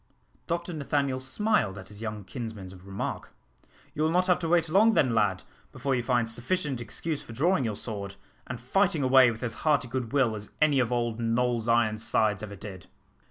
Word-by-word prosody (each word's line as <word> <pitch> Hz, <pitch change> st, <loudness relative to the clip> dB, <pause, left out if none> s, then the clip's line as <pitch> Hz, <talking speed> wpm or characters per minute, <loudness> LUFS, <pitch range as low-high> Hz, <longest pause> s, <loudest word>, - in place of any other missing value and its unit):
Dr 170 Hz, +1 st, -2 dB
Nathaniel 140 Hz, -3 st, -1 dB
smiled 130 Hz, -, 0 dB
at 95 Hz, -1 st, -10 dB
his 105 Hz, +1 st, -11 dB
young 105 Hz, -2 st, -4 dB
kinsman's 110 Hz, -4 st, -7 dB
remark. 95 Hz, +1 st, -5 dB, 0.6 s
"You 150 Hz, -, -3 dB
will 155 Hz, -, +3 dB
not 180 Hz, +2 st, +2 dB
have 180 Hz, -1 st, +3 dB
to 165 Hz, -2 st, -2 dB
wait 170 Hz, -1 st, +3 dB
long 210 Hz, +7 st, +4 dB
then, 130 Hz, -4 st, +3 dB
lad, 105 Hz, -4 st, +1 dB, 0.3 s
before 140 Hz, -, -2 dB
you 125 Hz, -, +1 dB
find 120 Hz, -1 st, +1 dB
sufficient 130 Hz, +3 st, -2 dB
excuse 150 Hz, +6 st, -4 dB
for 115 Hz, -, -11 dB
drawing 155 Hz, +3 st, +2 dB
your 110 Hz, -2 st, -2 dB
sword, 100 Hz, -3 st, -6 dB, 0.3 s
and 125 Hz, -1 st, -5 dB
fighting 160 Hz, -, +1 dB
away 130 Hz, -1 st, +6 dB
with 115 Hz, +1 st, -5 dB
as 115 Hz, -, -1 dB
hearty 150 Hz, -4 st, +2 dB
good 125 Hz, -2 st, -3 dB
will 135 Hz, -5 st, +2 dB
as 105 Hz, -1 st, -7 dB
any 150 Hz, -3 st, +4 dB
of 125 Hz, -2 st, +1 dB
old 120 Hz, -2 st, -1 dB
Noll's 120 Hz, 0 st, 0 dB
Ironsides 110 Hz, -2 st, +2 dB
ever 105 Hz, -1 st, -7 dB
did." 95 Hz, -2 st, -9 dB
125 Hz, 190 wpm, -28 LUFS, 110-150 Hz, 0.6 s, away